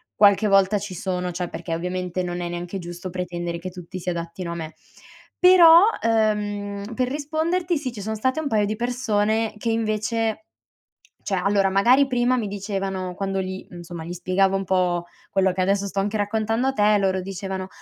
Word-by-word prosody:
qualche 205 +1 +5
volta 195 0 +4
ci 200 -1 -6
sono, 180 0 -2
cioè 175 +1 -3
perché, 165 - -5
ovviamente, 180 +1 -3
non 175 0 -4
è 175 - -3
neanche 175 +2 -5
giusto 175 +1 -7
pretendere 175 -1 -4
che 185 +2 -6
tutti 180 0 -8
si 180 +1 -4
adattino 170 0 -4
a - - -4
me. 160 -1 -6 0.7
Però, 350 -2 +8 0.2
uhm, 210 -1 0
per 255 +1 0
risponderti, 320 +5 -1
sì 275 -3 -4
ci 210 - -7
sono 220 +2 -3
state 260 +7 0
un 315 - -2
paio 215 -5 +2
di 215 +1 -2
persone 225 -2 0
che 230 +2 -2
invece 220 0 -1 0.8
cioè 195 - -2
allora 195 +1 +2
magari 245 +8 +5
prima 250 -1 +1
mi 230 -4 -1
dicevano 195 -2 -3
quando 195 0 -2
gli 190 0 -6
insomma 175 -1 -8
gli 170 - -6
spiegavo 185 +2 +1
un 195 - -2
po' 180 -2 +1 0.2
quello 190 -1 +2
che 185 - -3
adesso 200 +1 +1
sto 195 - -5
anche 205 +2 -1
raccontando 220 +4 0
a - - +1
te 210 -4 +3
loro 190 -1 +1
dicevano: 190 0 -5
195 Hz, 185 wpm, -23 LUFS, 180-220 Hz, 0.8 s, Però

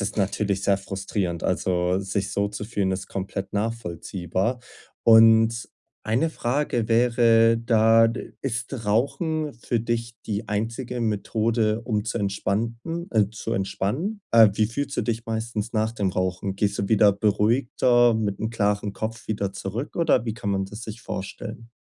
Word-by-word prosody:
ist 100 - -3
natürlich 100 -1 0
sehr 100 -1 +2
frustrierend. 95 -3 -3
Also, 90 0 +1
sich 95 0 -2
so 100 0 0
zu 105 0 -6
fühlen, 100 -4 -1
ist 95 0 -4
komplett 95 0 -5
nachvollziehbar. 100 0 -2 0.4
Und 115 0 +6 0.3
eine 125 +9 +1
Frage 120 -4 -1
wäre 115 -1 +4
da, 115 -1 +5 0.3
ist 120 -2 -3
Rauchen 150 +7 0
für 115 0 -2
dich 115 0 -2
die 110 0 -3
einzige 115 +4 -3
Methode, 110 0 0
um 110 -3 -1
zu 115 - -2
entspannten 115 - -2
äh, 105 -4 +3
zu 110 +1 -5
entspannen? 105 - -2
Äh, 115 -2 +7
wie 110 - +2
fühlst 140 +5 -4
du - - +1
dich 115 -1 -3
meistens 110 0 -3
nach 110 0 +1
dem 100 -5 -1
Rauchen? 95 +1 -2
Gehst 100 0 -1
du 100 - -1
wieder 105 -2 +5
beruhigter, 120 +3 +3
mit 105 -3 -1
'nem 110 - -2
klaren 105 -2 0
Kopf 110 +1 -5
wieder 100 -3 -2
zurück 100 +8 -5
oder 165 -8 +3
wie 110 - -2
kann 105 -3 -3
man 95 -1 0
das 105 +4 -9
sich 110 0 -8
vorstellen? 115 +4 -7
110 Hz, 155 wpm, -24 LUFS, 100-115 Hz, 0.4 s, Äh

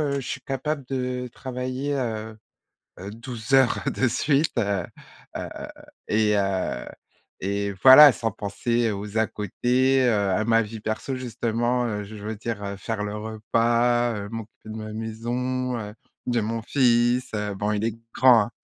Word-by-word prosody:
heu, 145 -2 0
je 130 - -8
suis - - -4
capable 140 +2 -3
de 125 -1 -2
travailler, 130 +2 -4
heu, 110 -4 -3 0.6
heu, 100 +2 -7
12 115 +2 -6
heures 135 -3 +4
de 130 - +1
suite, 140 +5 +1
heu, 100 -5 0 0.5
heu - - -4 0.6
et 105 0 +2
heu, 95 -2 -1 0.6
et 100 +1 -1
voilà, 140 +3 +11
sans 115 -1 -2
penser 115 +3 -1
aux 105 +1 -5
à 110 0 +3
côtés, 125 +6 +1
heu, 105 -5 +2
à 105 +4 +1
ma 115 0 +4
vie 110 0 -6
perso 110 +5 -3
justement, 120 0 -1
heu, 105 -3 -3
je 105 +2 -10
veux 105 +1 -6
dire 100 -2 -4
faire 110 -1 -3
le 105 +1 -4
repas, 115 +2 +1
heu, 100 -1 -5
m'occuper 110 -1 -9
de 110 - -6
ma 110 -1 -6
maison, 120 +3 -3
heu, 105 -2 -6 0.3
de 120 -1 +1
mon 115 +2 -2
fils, 120 0 +2
heu, 105 -1 -2
bon 105 +2 -1
il 105 0 -1
est 115 -1 0 0.2
grand, 125 -4 +6
hein. - - -9
115 Hz, 165 wpm, -25 LUFS, 105-125 Hz, 0.6 s, voilà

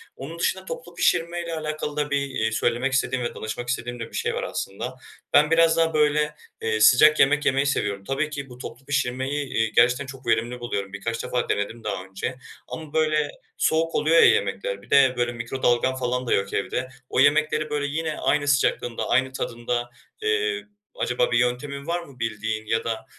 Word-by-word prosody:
Onun - - -8
dışında 465 0 0
toplu - - -7
pişirmeyle 170 0 0
alakalı 155 -1 -4
da 150 0 0
bir, 140 - +2
eee, 110 -4 -1
söylemek 120 +4 0
istediğim 130 -1 +1
ve - - -4
danışmak 120 +3 -5
istediğim 120 0 -3
de 115 - -5
bir - - -23
şey - - -1
var - - -2
aslında. 115 +6 -4 0.4
Ben 150 +2 +5
biraz 165 0 +5
daha 165 -1 +2
böyle, 150 0 +2 0.3
eee, 110 -1 0
sıcak 150 +8 +7
yemek 140 +2 +4
yemeyi 135 +1 +2
seviyorum. 100 -8 -1
Tabii 135 +7 -1
ki 140 -3 -6
bu 125 - -11
toplu 125 +1 -9
pişirmeyi, 140 +1 -1
eee, 115 0 +1
gerçekten 125 +3 +4
çok 130 -2 -11
verimli 115 +2 +1
buluyorum. 100 -5 -4
Birkaç 115 +3 -3
defa 125 - -2
denedim 110 +3 -2
daha 100 -3 -3
önce 95 +7 -4 0.3
ama 155 -2 -8
böyle 155 -2 +2 0.3
soğuk 165 +1 +1
oluyor 160 +2 +3
ya - - +8
yemekler, 100 0 +1
bir - - -19
de 135 -2 +6
böyle 120 0 +1
mikrodalgam 120 +1 0
falan 125 0 -2
da - - +2
yok 100 0 0
evde, 130 +5 -2 0.2
o - - 0
yemekleri 155 +2 +3
böyle 145 -1 -1
yine 155 +1 -2
aynı 145 -1 +1
sıcaklığında, 130 -4 +1
aynı 130 +1 +2
tadında, 120 -1 -3 0.3
eee, 435 -1 0 0.3
acaba - - 0
bir - - +3
yöntemin 140 +4 -1
var 175 +1 0
mı 140 -6 -15
bildiğin 110 -1 -3
ya 115 +1 0
da 115 -1 -3
130 Hz, 190 wpm, -24 LUFS, 120-150 Hz, 0.4 s, ya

